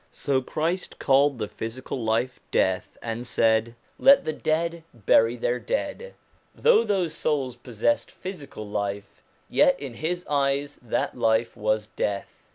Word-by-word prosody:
So 135 -2 0
Christ 165 +7 -2
called 140 0 +3
the 105 -2 -3
physical 120 +3 -5
life 115 +3 0
death, 95 -1 0
and 115 +1 -4
said: 115 0 +2
' - - -35
Let 275 0 +7
the 155 - -1
dead 165 +2 -1
bury 115 +2 +4
their 120 +1 -1
dead.' - - -3 0.4
Though 475 - +5
those 190 -7 0
souls 140 -6 -1
possessed 120 -1 -1
physical 145 - -8
life, 100 0 -4 0.3
yet - - +4
in 135 -4 -6
his 175 +7 -3
eyes 140 0 0
that 120 - -2
life 110 +1 +1
was 110 -1 0
death. 100 -1 -4
130 Hz, 145 wpm, -25 LUFS, 110-155 Hz, 0.4 s, Let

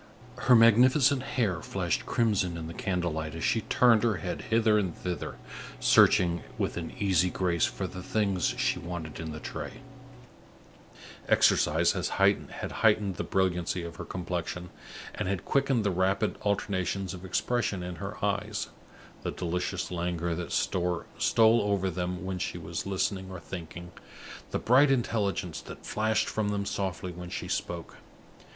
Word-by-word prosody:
Her 125 - +8
magnificent 125 +4 +6
hair 115 - -1
flashed - - -2
crimson 100 -7 +1
in 80 - -5
the 80 - -7
candle 90 -2 -1
light, 80 0 -4
as 80 - -5
she 115 - +2
turned 115 0 +4
her 115 -3 +2
head 90 -1 -4
hither 110 -1 +4
and 95 -5 -2
thither, 90 -1 -4 0.4
searching 85 -1 +5 0.2
with - - -1
an 85 -1 -4
easy 90 -3 +2
grace 90 -2 +1
for - - -4
the 95 - -6
things 100 0 0
she 130 +1 +1
wanted 85 -3 -6
in 80 -1 -5
the 80 - -6
tray. - - -6 1.6
Exercise - - +4
had - - -2 0.6
heightened 105 -4 +2
the - - -2
brilliancy 90 -2 0
of 85 -1 -7
her - - -5
complexion, 90 0 -4 0.4
and - - -3
had 95 -2 -2
quickened 135 -4 +2
the 100 - +1
rapid 95 +4 +1
alternations 95 -2 -1
of 90 -1 -9
expression 100 +1 -1
in 90 -1 -6
her 100 +2 -6
eyes 100 -1 -2 0.5
the - - -3
delicious 90 +2 -3
languor 85 -1 -1
that 85 +1 -5
stole 95 +6 +2
over 100 -2 0
them 90 +1 -3
when 95 -1 -3
she - - -3
was - - -5
listening 95 0 -1
or 95 -1 -7
thinking, 85 0 -8 0.6
the - - -1
bright 135 +5 +5
intelligence 105 -9 0
that - - -11
flashed 110 +1 +1
from 110 -2 -1
them 100 -1 -1
softly 95 -2 -3
when 90 0 -8
she - - -5
spoke. 85 -1 -4
95 Hz, 155 wpm, -29 LUFS, 85-105 Hz, 1.6 s, Her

